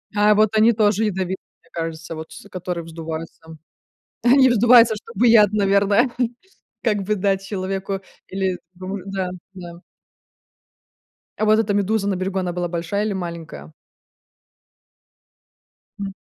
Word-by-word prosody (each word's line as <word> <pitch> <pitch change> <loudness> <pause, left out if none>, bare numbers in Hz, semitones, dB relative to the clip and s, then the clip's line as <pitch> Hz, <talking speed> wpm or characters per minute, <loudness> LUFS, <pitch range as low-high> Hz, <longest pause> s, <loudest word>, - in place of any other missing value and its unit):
А 210 +1 +5
вот 215 0 +4
они 220 +2 +5
тоже 215 0 +2
ядовитые, 190 -2 -2 0.2
мне - - -28
кажется, 165 0 -5
вот 160 0 -8
с 200 - -12
которые 180 -2 -5
вздуваются. 165 0 -7 0.8
Они 260 +2 +6
вздуваются, 235 -1 +6
чтобы 230 +2 -1
яд, 215 -3 +6
наверное, 200 +3 +3 0.7
как 210 -4 +1
бы 210 +2 0
дать 195 0 0
человеку 195 0 -3 0.3
или 190 -1 -2 0.2
дру 185 +2 -6
да, 195 -2 -3 0.2
да. 175 -2 -10 1.6
А 215 - +1
вот 215 0 +5
эта 215 -2 +1
медуза 205 0 0
на 190 - -1
берегу 190 +1 -2
она 180 -1 -2
была 175 0 -2
большая 175 +5 -2
или 215 - -1
маленькая? 170 - -7 2.3
М. 195 -1 -4
195 Hz, 135 wpm, -21 LUFS, 180-210 Hz, 2.3 s, Они